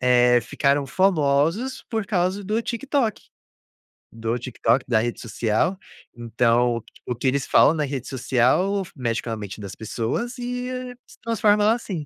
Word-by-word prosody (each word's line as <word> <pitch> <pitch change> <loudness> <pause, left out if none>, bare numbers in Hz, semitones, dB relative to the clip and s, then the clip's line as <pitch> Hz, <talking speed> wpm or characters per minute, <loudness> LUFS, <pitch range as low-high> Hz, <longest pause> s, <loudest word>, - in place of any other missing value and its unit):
eh, 125 -1 +5
ficaram 140 +4 0
famosos 165 - +1
por 220 -3 -2
causa 190 0 0
do 215 +4 -1
TikTok. 245 -1 -1 0.9
Do 115 +1 -2
TikTok, 125 +1 0
da 115 -3 +3
rede 120 +1 -2
social. 115 - 0 0.4
Então, 120 0 +1 0.2
o 125 - -2
que 125 - -2
eles 135 +1 +1
falam - - +5
na 155 -2 -1
rede 135 -3 -5
social 135 +10 +1
mexe 115 -4 -1
com - - -7
a - - -1
mente 105 -1 -7
das 100 -2 -7
pessoas 120 - -3
e 245 0 -4 0.4
se - - -17
transforma 210 -2 +2
ela 215 +2 +5
assim. 190 -10 -4
140 Hz, 155 wpm, -23 LUFS, -, 0.9 s, eh